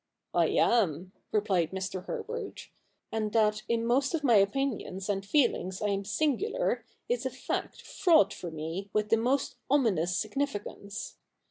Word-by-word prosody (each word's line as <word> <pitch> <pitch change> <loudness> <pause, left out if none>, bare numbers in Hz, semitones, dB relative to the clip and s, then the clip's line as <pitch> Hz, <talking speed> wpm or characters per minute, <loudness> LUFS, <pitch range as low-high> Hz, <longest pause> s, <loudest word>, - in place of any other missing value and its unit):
' - - -58
I - - +4
am,' 185 -6 +2 0.2
replied 195 -6 +2
Mr. 190 -1 -4
Herbert; - - -5 0.2
' - - -47
and 215 -1 -1
that 215 -1 +3
in 230 0 +1
most 270 +6 +2
of 310 - -3
my 250 -4 +4
opinions 200 -3 0
and 195 -1 0
feelings 195 - +1
I 210 - 0
am 200 0 -1
singular, 310 - 0 0.2
is 245 0 0
a 260 - 0
fact 255 +1 -4
fraught 320 - +4
for 175 - -6
me 165 +5 -5
with 210 0 +1
the 225 - +5
most 255 +5 0
ominous 190 - +2
significance. 210 -3 -4
210 Hz, 155 wpm, -29 LUFS, 190-255 Hz, 0.2 s, the